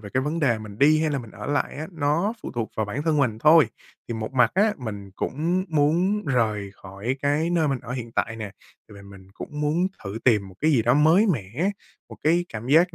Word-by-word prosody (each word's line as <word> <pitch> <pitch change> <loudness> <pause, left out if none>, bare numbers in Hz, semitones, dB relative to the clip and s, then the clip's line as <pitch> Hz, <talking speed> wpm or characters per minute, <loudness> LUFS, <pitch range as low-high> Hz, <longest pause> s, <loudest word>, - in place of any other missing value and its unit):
về 105 -2 -10
cái 130 - +3
vấn 160 +4 -2
đề 120 -6 +2
mình 105 -1 -10
đi 155 +2 +5
hay 155 -1 +1
là 140 - -1
mình 115 -4 -9
ở - - -8
lại 145 0 -1
á, 155 +2 -5
nó 160 +6 0
phụ - - -5
thuộc 115 -2 -3
vào 110 -1 0
bản 125 +8 -3
thân 160 -2 +1
mình 120 -6 +1
thôi. 155 +4 +6 0.4
Thì 115 - -3
một 110 +2 -5
mặt 125 -2 +4
á, 210 +2 +3
mình 100 -5 -7
cũng 170 +7 -1
muốn 170 +7 +1
rời 110 -7 0
khỏi 100 +8 -5
cái 150 +4 +1
nơi 165 -4 +2
mình 135 -2 0
ở 125 - -7
hiện 120 -3 -6
tại 110 0 -1
nè, 110 -3 -6 0.4
tại - - -13
vì 100 - -12
mình 100 -1 -14
cũng 150 0 -7
muốn 160 +5 +1 0.2
thử 100 +3 -5
tìm 105 -6 +3
một 95 - -14
cái 155 - +3
gì 130 -7 +3
đó 120 +2 +3
mới 160 +8 +5
mẻ, 145 - -1 0.4
một - - -11
cái 170 +3 +3
cảm 115 +2 -7
giác 170 +5 +4
140 Hz, 245 wpm, -24 LUFS, 110-160 Hz, 0.4 s, thôi